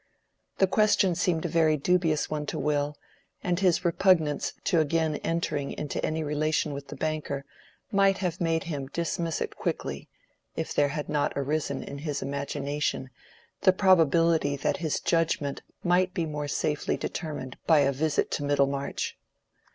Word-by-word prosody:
The 195 - +5
question 200 -1 +3
seemed 170 -1 0
a - - +2
very 160 -2 +3
dubious 165 0 +2
one 150 -1 -3
to - - -3
Will, 150 0 0 0.5
and 175 -1 0
his 180 -2 +2
repugnance 170 -4 +2
to 175 -4 +2
again 155 0 +1
entering 155 -4 -2
into 150 -2 -4
any 160 0 -1
relation 150 0 0
with 140 0 -7
the 145 - -8
banker 145 -1 -3 0.5
might 195 -1 +4
have 180 -2 -2
made 165 0 +1
him 145 -6 -4
dismiss 165 +2 -2
it - - -3
quickly, - - -3 0.5
if - - -3
there 145 - +3
had 150 +1 -4
not 150 -1 0
arisen 145 +2 -1
in 140 - -7
his 145 -1 -3
imagination 140 -1 -2 0.5
the 185 -2 +6
probability 165 -5 +4
that 140 - -1
his 160 -3 -1
judgment 160 -4 0 0.2
might 180 +1 +2
be 170 -4 0
more 150 -1 -4
safely 150 +1 -1
determined 150 -6 -5
by 160 -3 +6
a 140 0 +3
visit 150 +2 0
to 145 - -1
Middlemarch. 140 -1 0
155 Hz, 155 wpm, -27 LUFS, 145-170 Hz, 0.5 s, the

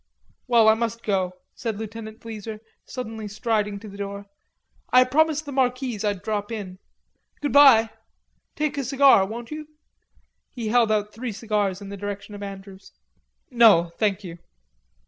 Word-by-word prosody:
"Well, 235 -3 +5
I 220 - +8
must 230 0 -3
go," 190 -3 0 0.2
said 225 -4 -4
Lieutenant 220 0 -8
Bleezer, 220 -1 -7 0.3
suddenly 225 -4 -6
striding 210 -1 -1
to 220 - -10
the 200 0 -11
door. 200 0 -5 0.7
"I 255 0 +7
promised 310 +3 +1
the 285 - -7
Marquise 255 -4 -1
I'd 205 -3 -1
drop 210 0 -3
in. 190 -4 -6 0.6
Good 290 - -2
bye.... 250 -6 +7 0.6
Take 300 -2 -1
a - - -1
cigar, 265 -6 +5
won't 230 +4 -7
you?" 305 0 -6 0.8
He 235 -4 -5
held 230 -1 +3
out 210 -1 0
three 235 +2 -5
cigars 205 -3 -1
in 200 - -8
the 200 - -7
direction 205 +1 -6
of 205 - -8
Andrews. 195 -1 -10 0.6
"No, 210 -9 +5
thank 205 -2 +1
you." 170 -2 -9
220 Hz, 155 wpm, -24 LUFS, 200-245 Hz, 0.8 s, I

